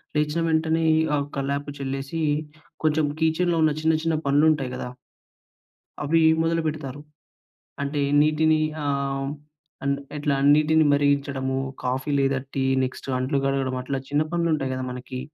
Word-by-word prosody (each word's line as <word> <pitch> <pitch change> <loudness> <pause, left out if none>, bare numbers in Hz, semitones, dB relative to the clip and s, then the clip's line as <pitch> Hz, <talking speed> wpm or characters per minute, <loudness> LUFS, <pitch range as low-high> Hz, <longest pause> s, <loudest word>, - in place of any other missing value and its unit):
లేచిన 150 +2 +1
వెంటనే 160 0 +1 0.3
ఆహ్, 140 0 -1
కల్లాపు 140 +1 -2
చెల్లేసి, 135 +4 -3 0.6
కొంచెం 155 0 +2 0.2
కిచెన్‌లో 165 +1 +2
ఉన్న 155 -1 +3
చిన్న, 160 0 +3
చిన్న 165 -1 +1
పనులు 145 +3 +4
ఉంటాయి 135 -4 -2
గదా! 125 - -5 1.1
అవి 165 +3 +2 0.2
మొదలుపెడతారు. 155 -4 -2 0.8
అంటే, 140 +1 -1 0.2
నీటిని 155 +1 +3 0.2
ఆహ్, 140 -1 -1 0.6
అండ్ 140 0 +1 0.2
ఎట్లా 145 -1 0 0.2
నీటిని 155 +1 +4
మరిగించడము, 140 -2 +1 0.3
కాఫీ 130 +3 -1
లేదా 135 -1 +1 0.2
టీ, 135 -1 +1 0.2
నెక్స్ట్ 130 +1 -5
అంట్లు 135 +2 0
కడగడం 135 -2 0
అట్లా 135 +1 -2
చిన్న 145 +2 +2
పనులు 170 -1 +1
ఉంటాయి 135 -3 -3
గదా! 130 0 -3
మనకి. 125 +1 -6
145 Hz, 135 wpm, -24 LUFS, 135-155 Hz, 1.1 s, పనులు